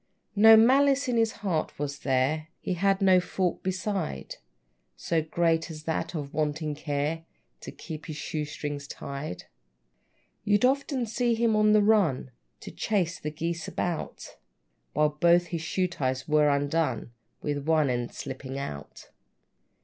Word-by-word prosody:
No 220 +2 +8
malice 275 +4 +4
in 250 - 0
his 225 -1 +2
heart 165 -5 -1
was 140 -1 -4
there; 135 +4 0
He 185 - -2
had 195 +2 +1
no 185 -1 +6
fault 180 0 -2
beside, 185 - -3 0.6
So 160 - 0
great 165 +1 0
as 155 -2 -8
that 160 +2 -2
of 145 -3 -5
wanting 150 0 -1
care. 150 +2 -2 0.4
To - - -8
keep 155 -2 -9
his 155 - -5
shoe 150 0 -3
strings 145 -1 -5
tied. 140 -8 -6 1.0
You'd 205 +3 +3
often 270 -1 +1
see 235 +1 0
him 225 -1 +2
on 215 0 +4
the 210 -1 +5
run, 195 -12 +2 0.3
To - - -8
chase 185 -5 -1
the 150 - -4
geese 165 +2 -4
about, 175 -3 -4 0.6
While 150 0 +3
both 170 +4 +3
his 165 - -1
shoe 185 +3 0
ties 130 -6 -3
were 150 -1 +4
undone, 140 -4 0 0.3
With 145 -1 -3
one 155 -2 +3
end 120 -1 -2
slipping 135 0 -6
out. 75 - -7
160 Hz, 150 wpm, -27 LUFS, 145-195 Hz, 1.0 s, No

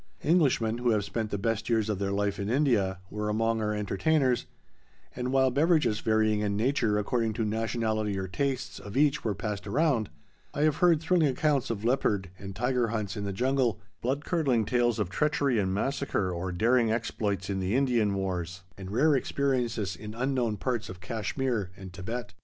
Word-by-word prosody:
Englishmen, 135 -9 +2
who 120 0 +1
have 105 -3 +2
spent 110 0 -3
the 100 - -2
best 110 +2 -1
years 110 -2 +2
of 105 -3 -2
their 100 -1 -1
life 100 0 -1
in 100 +1 -2
India, 115 -8 +2
were 105 0 -2
among 115 +1 +1
our 105 0 0
entertainers, 125 +6 +1 0.7
and 125 +1 -2
while 130 -1 +3
beverages 150 -5 +2
varying 110 -1 +2
in 100 -1 -1
nature 115 -2 +1
according 110 +1 0
to 115 0 -1
nationality 110 -1 -1
or 95 0 -3
tastes 135 +5 -2
of 105 +4 -7
each 145 0 +3
were 105 -3 -1
passed 105 0 -4
around, 130 -2 +1 0.5
I 145 - -1
have 155 -1 +3
heard 170 -3 +4
thrilling 165 -1 +3
accounts 140 0 +1
of 110 -2 -3
leopard 105 -7 +1
and 95 -1 -8
tiger 125 0 +1
hunts 105 -3 -3
in 100 -2 -4
the 100 - -2
jungle, 125 +1 +1 0.2
blood 135 +4 -1
curdling 135 - +1
tales 120 +1 +1
of 100 -4 -2
treachery 140 0 +1
and 95 -2 0
massacre 105 -2 -1
or 90 +1 -3
daring 115 +5 +2
exploits 105 -4 -2
in 95 -1 -2
the 95 +4 0
Indian 120 -7 +2
wars, 90 -2 -3
and 95 -1 -8
rare 145 +8 +3
experiences 120 -8 -1
in 105 +4 -8
unknown 125 -3 0
parts 120 0 -2
of 90 -1 -8
Cashmere 110 +2 -2
and 95 -2 -10
Thibet. 115 +6 -5
115 Hz, 185 wpm, -28 LUFS, 100-130 Hz, 0.7 s, heard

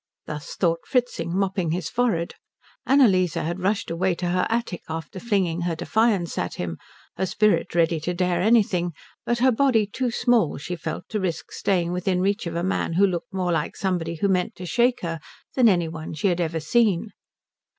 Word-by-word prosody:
Thus 150 -1 -6
thought 165 -2 0
Fritzing, 190 - 0
mopping 190 -3 0
his 170 0 -1
forehead. 215 -8 0 0.5
Annalise 195 - +4
had 170 +3 -2
rushed 200 0 0
away 180 +2 +1
to 175 0 -2
her 180 +1 +1
attic 225 -6 -2
after 160 +3 -5
flinging 185 -6 0
her 170 -1 -1
defiance 205 0 +1
at 90 -1 -3
him, 85 -2 -4 0.4
her 190 - 0
spirit 190 -5 +1
ready 165 -1 +3
to 175 +4 -2
dare 180 -1 +1
anything 190 -5 +3 0.3
but 240 - +1
her 255 +2 +4
body 240 -3 +3
too 245 +5 -2
small, 235 - +2
she 170 +5 -5
felt, 160 -1 -5
to 215 - -1
risk 170 -5 -3
staying 180 -4 0
within 180 +1 0
reach 200 +1 0
of 165 - -4
a 170 - -1
man 185 -2 -1
who 195 +4 +5
looked 185 +5 -3
more 185 -2 -1
like 165 - -1
somebody 175 -4 -1
who 185 +5 0
meant 185 -2 0
to 180 - -8
shake 240 +6 +2
her 165 -2 -3 0.3
than 245 -3 +5
any 175 -4 +2
one 160 0 -6
she 190 +6 +1
had 175 0 0
ever 165 -1 -1
seen. 210 +3 +2
180 Hz, 190 wpm, -24 LUFS, 170-210 Hz, 0.5 s, who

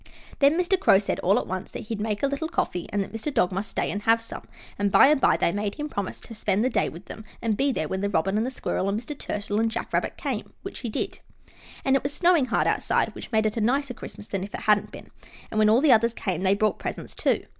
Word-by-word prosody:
Then 285 +4 +4
Mr. 360 +1 +2
Crow 380 - +6
said, 200 - -1
all 195 +5 +3
at - - -1
once, 185 0 -5
that - - -7
he'd 215 -1 -5
make 210 +1 -2
a - - +4
little 280 +3 -2
coffee, 180 - -2
and 205 0 0
that 195 - -11
Mr. 225 +7 -3
Dog 180 -9 +2
must 195 +3 -3
stay - - -1
and 205 - -3
have 225 +2 +4
some, 230 0 -9 0.3
and 200 0 +1
by 270 - +7
and 300 -2 +3
by - - +4
they - - +2
made 205 +1 -2
him 300 0 -4
promise 200 -7 -4
to 230 - -10
spend 210 0 0
the 260 - +1
day - - +1
with 170 +4 -11
them 220 - -9 0.2
and 225 -3 0
be 275 +5 +1
there 155 -11 -2
when 190 +4 -3
the 200 - 0
Robin 195 +1 +1
and 215 - +2
the 250 - -1
Squirrel 195 -6 -2
and 205 +2 0
Mr. 270 +6 -7
Turtle 205 -5 -3
and 225 0 +2
Jack 230 +1 -5
Rabbit - - -1
came, - - -4
which - - -7
he 240 - -4
did. - - -3 0.7
And 270 0 +4
it 270 - +2
was 280 +1 -3
snowing 345 -6 +4
hard 245 - +1
outside, - - +1
which - - -9
made 220 -1 +2
it 215 +1 -1
a - - 0
nicer 260 +4 +1
Christmas 210 - -9
than 195 -3 -3
if 200 - -6
it - - -6
hadn't 210 -1 +3
been, - - -12 0.4
and 215 - 0
when 215 0 +5
all 230 +4 +5
the 300 -2 +5
others 230 +1 +3
came 185 -4 -2
they 195 +1 +3
brought 215 +1 +1
presents, - - -5
too. - - 0
220 Hz, 280 wpm, -25 LUFS, 200-265 Hz, 0.7 s, by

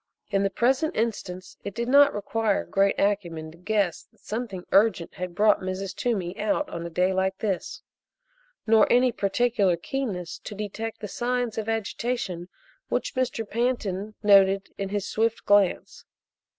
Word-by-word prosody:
In 195 -1 +2
the 200 - +2
present 265 +9 +1
instance 195 -5 -3
it 200 - -6
did 235 0 -2
not 285 +2 +6
require 210 0 -1
great 195 0 +2
acumen 170 -6 -1
to 165 - -16
guess 200 -2 0
that - - -33
something 210 -5 -5
urgent 195 -4 +3
had 180 -2 -6
brought 210 +2 +4
Mrs. 185 +1 -4
Toomey 195 -7 -1
out 215 +8 0
on 170 - -5
a 170 - -5
day 180 +3 +1
like 190 0 0
this, 195 -5 -3 0.8
nor 220 -1 +5
any 250 +1 +5
particular 200 -3 +1
keenness 185 -5 -4
to 210 - -8
detect 215 +2 -5
the 210 - -4
signs 245 +1 -1
of 220 0 -4
agitation 225 -4 -3 0.4
which - - -1
Mr. 250 -4 -1
Pantin 215 -4 -2
noted 195 -1 +5
in 195 -1 -4
his 205 0 -2
swift 225 +1 0
glance. 205 -3 +2
205 Hz, 155 wpm, -26 LUFS, 190-230 Hz, 0.8 s, not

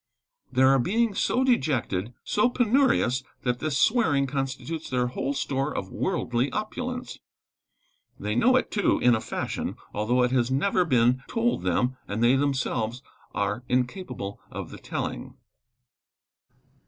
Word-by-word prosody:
There 130 +1 +5
are 135 0 +5
beings 215 - +1
so 255 - +2
dejected 125 - 0
so 210 +4 +2
penurious 245 - +2 0.2
that 125 -1 0
this 155 -3 -1
swearing 165 - +3
constitutes 135 +4 -4
their 125 -1 +1
whole 135 +3 -2
store 135 +1 -1
of - - -4
worldly 130 -8 -1
opulence. 250 +4 -4 1.0
They - - -2
know 255 +2 +4
it 255 - +1
too, 205 - +2
in 125 - +4
a 110 - +1
fashion, - - -3 0.2
although 120 +4 +2
it 125 - +1
has 125 -2 +2
never 180 +7 +2
been 125 -3 +3
told 235 +1 0
them 125 +1 0
and 105 +3 -2
they 120 +3 +5
themselves 130 -3 -1 0.3
are 105 +4 -1
incapable 125 - -2
of - - -7
the - - -9
telling. - - -5
135 Hz, 140 wpm, -26 LUFS, 125-200 Hz, 1.0 s, There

